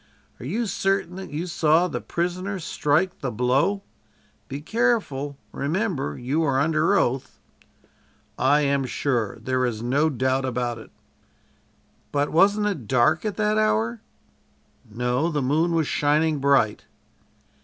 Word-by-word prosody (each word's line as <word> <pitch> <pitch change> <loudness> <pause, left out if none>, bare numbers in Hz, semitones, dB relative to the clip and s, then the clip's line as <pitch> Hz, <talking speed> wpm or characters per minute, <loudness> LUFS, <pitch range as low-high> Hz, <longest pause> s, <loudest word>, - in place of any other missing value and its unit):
"Are 125 - -7
you 225 - -1
certain 195 -3 -1
that 190 - -7
you 150 +4 -4
saw 170 0 +2
the - - -4
prisoner 185 +3 -3
strike 165 +1 0
the 135 - -3
blow? 135 - +1 0.6
Be 140 - -5
careful 155 - -1
remember 155 - -2
you 135 +6 -1
are 140 -4 +1
under 155 +6 +2
oath!" 130 -6 -1 1.0
"I 145 +4 +3
am 140 -1 +1
sure. 120 -4 -1
There 130 0 -1
is 115 -3 -2
no 140 +6 +2
doubt 130 0 0
about 125 -2 -2
it." - - -13 1.2
"But 145 0 0
wasn't 200 +5 +4
it 165 - -3
dark 130 - +2
at 210 - -3
that 215 0 +1
hour?" 115 - +1 0.9
"No, 125 +8 0
the 150 -4 -1
moon 160 +6 +1
was 165 -2 +2
shining 150 +1 +1
bright." 135 -6 +2
145 Hz, 135 wpm, -24 LUFS, 130-180 Hz, 1.2 s, wasn't